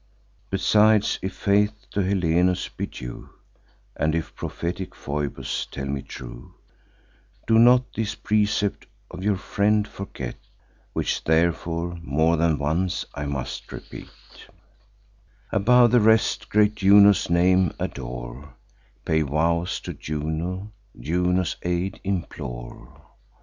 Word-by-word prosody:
"'Besides, 105 +2 +3
if 95 +1 -4
faith 105 +1 +1
to - - -2
Helenus 90 -1 +1
be - - -5
due, - - -9 0.7
And 80 +1 0
if 80 - -3
prophetic 90 +2 -5
Phoebus 70 -2 -3
tell 70 - -6
me 70 0 -3
true, - - -10 0.9
Do 110 0 +4
not 125 +2 +5
this 110 -1 -2
precept 105 -2 0 0.2
of 90 +1 -8
your 105 0 +2
friend 105 +2 +1
forget, 70 -12 -7 0.6
Which - - -1
therefore 85 +1 0
more 80 +1 +2
than 80 -1 +2
once 85 +6 -1
I 70 0 -4
must 65 -2 -5
repeat: - - -9 1.4
Above 120 +3 +5
the 120 -1 +5
rest, 110 +1 +3
great 105 0 +3
Juno's 100 -1 +5
name 90 0 +3
adore; 60 +2 -6 0.5
Pay 80 0 +2
vows 85 +4 0
to - - -6
Juno; 80 +6 -4 0.3
Juno's 90 +5 0
aid 90 +2 -2
implore. 60 -11 -6
90 Hz, 115 wpm, -24 LUFS, 75-100 Hz, 1.4 s, not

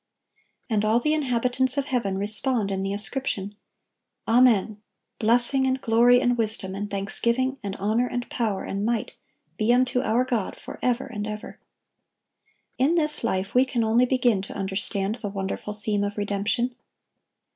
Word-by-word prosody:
And 215 -3 0
all 220 +2 +3
the 300 +5 +1
inhabitants 255 -2 0
of 280 - 0
heaven 235 -8 -1
respond 210 +1 +3
in 190 0 -2
the 195 0 -2
ascription, 205 -1 0 0.7
"Amen: 225 -3 +3 0.4
Blessing, 245 +4 +3
and 260 0 0
glory, 240 +1 +4
and 245 -1 +1
wisdom, 215 -4 -2
and 205 +1 -4
thanksgiving, 235 +7 -1
and 200 -1 -5
honor, 220 +5 0
and 245 0 -4
power, 215 -5 -2
and 195 +1 -4
might, 230 0 -2 0.4
be 220 +2 +2
unto 250 0 +2
our 245 +1 +1
God 235 -6 -2
forever 250 0 -2
and 215 -6 -5
ever."(1130) 210 0 -7 1.2
In 285 +6 +3
this 305 -4 0
life 195 -2 -1
we 250 - +5
can 255 -3 -1
only 230 +3 +3
begin 245 -6 +2
to 195 - -9
understand 195 +2 -2
the 205 - -3
wonderful 195 +1 -4
theme 210 -1 -1
of 205 +1 -4
redemption. 205 +4 -1
230 Hz, 155 wpm, -25 LUFS, 205-250 Hz, 1.2 s, we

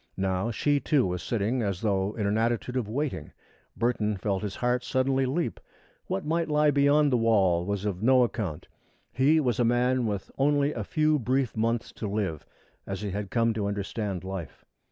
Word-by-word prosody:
Now 95 +2 0
she, 145 +5 +1
too, 140 -2 +2
was 90 -1 -2
sitting 115 +3 -1
as 100 -4 -2
though 100 -1 0
in 105 - -2
an 100 +1 +1
attitude 115 +2 0
of 120 -5 -1
waiting. 125 - -3 0.4
Burton 110 -3 0
felt 95 0 -1
his 105 -2 -4
heart 125 0 0
suddenly 130 +1 +1
leap. 160 +6 -2 0.5
What 95 - -2
might 165 +1 0
lie 150 0 +3
beyond 145 +1 +4
the 125 - +3
wall 95 -6 +2
was 100 0 -2
of 100 -3 -2
no 130 +2 +5
account. 105 -10 -3 0.4
He 145 +5 +3
was 125 -6 0
a - - +4
man 120 +1 +2
with 100 -2 -4
only 145 +1 +2
a 110 - -4
few 155 +6 +1
brief 130 +1 0
months 115 +1 -1
to 110 - -5
live, 100 -7 -3 0.4
as 95 0 -4
he 105 -2 -3
had 100 0 -4
come 115 -2 +2
to 105 -2 -2
understand 100 -2 -3
life. 95 -4 -7
115 Hz, 190 wpm, -27 LUFS, 100-130 Hz, 0.5 s, no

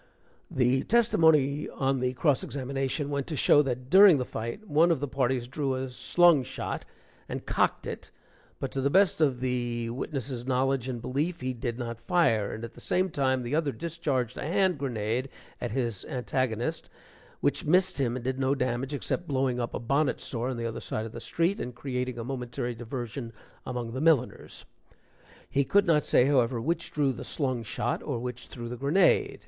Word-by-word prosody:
(The 130 +1 +2
testimony 160 - +3
on 135 0 0
the 125 0 0
cross 140 +1 +2
examination 135 +1 -2
went 140 -1 -2
to 155 - -3
show 145 - +5
that 125 -3 -3
during 190 -3 +9
the 125 - -2
fight, 115 - -6
one 160 +1 +4
of 165 -5 +2
the 145 - -2
parties 130 -2 0
drew 135 0 -1
a 130 0 -4
slung 170 +3 +4
shot 125 - -5 0.4
and - - -5
cocked - - +1
it, - - -6 0.5
but - - -3
to 135 - -2
the 140 - +2
best 190 0 +3
of 135 -5 +2
the 120 -2 -1
witness' 130 -1 -4
knowledge 130 0 0
and 120 -2 -5
belief, 155 +8 -2
he 130 0 -2
did 120 -1 -4
not 115 -2 -5
fire; 115 - +2
and 110 - -6
at 115 - -7
the - - -14
same 185 0 0
time, 130 -3 +1
the 120 +3 -4
other 150 -2 +1
discharged 145 -7 -2
a - - -4
hand 180 +2 +1
grenade 120 -1 -2 0.3
at 120 - -2
his 115 -4 -2
antagonist, 125 +3 -2 0.5
which - - 0
missed 185 +1 +3
him 125 -3 +1
and 130 - -5
did 130 0 -1
no 135 +1 +2
damage, 130 +2 -1
except 175 +4 -3
blowing 130 -3 0
up 120 - -3
a - - -2
bonnet 140 +4 +1
store 120 0 -2
on 130 - -3
the 115 - -3
other 115 -1 -3
side 110 - -3
of 115 - -7
the 115 - -7
street, 175 - 0
and 125 -1 -5
creating 125 -1 -3
a 115 - -4
momentary 125 0 -4
diversion 120 +1 -6 0.4
among 120 -2 -3
the 130 +3 -4
milliners.) 155 -6 +1 0.8
He 140 - +1
could 200 +8 +3
not 155 -4 +3
say, 125 - +4
however, 125 -3 +2
which 165 +7 -2
drew 140 -3 +1
the - - -7
slung 130 -5 -1
shot 110 - -2
or 140 -5 -3
which 125 +1 -6
threw 120 -2 -7
the 120 +1 -6
grenade. 150 +9 +3
130 Hz, 195 wpm, -28 LUFS, 120-145 Hz, 0.8 s, during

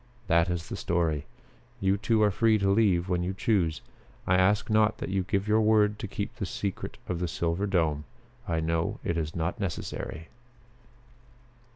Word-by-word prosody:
That 85 -1 +3
is 90 -2 -3
the - - -5
story. 80 -4 -1 0.5
You 95 0 +2
two 110 +1 +2
are 105 - +4
free 110 +2 +3
to 100 -1 0
leave 100 -4 +3
when 90 -2 0
you 90 +2 -2
choose. 95 -7 +1 0.4
I 95 - +2
ask 95 +3 +3
not 110 0 +3
that - - -5
you 95 0 +1
give 100 +2 -1
your 110 +1 +4
word 105 -1 +3
to 110 - -4
keep 100 +5 -5
the 105 - -2
secret 100 +3 -4
of 90 -1 -3
'Silver 85 +5 -1
Dome.' 80 -6 +1 0.4
I 80 -1 0
know 80 +1 -1
it 85 - -1
is 80 -1 -3
not 85 +6 -2
necessary." 85 -3 -4
95 Hz, 175 wpm, -28 LUFS, 85-105 Hz, 0.5 s, are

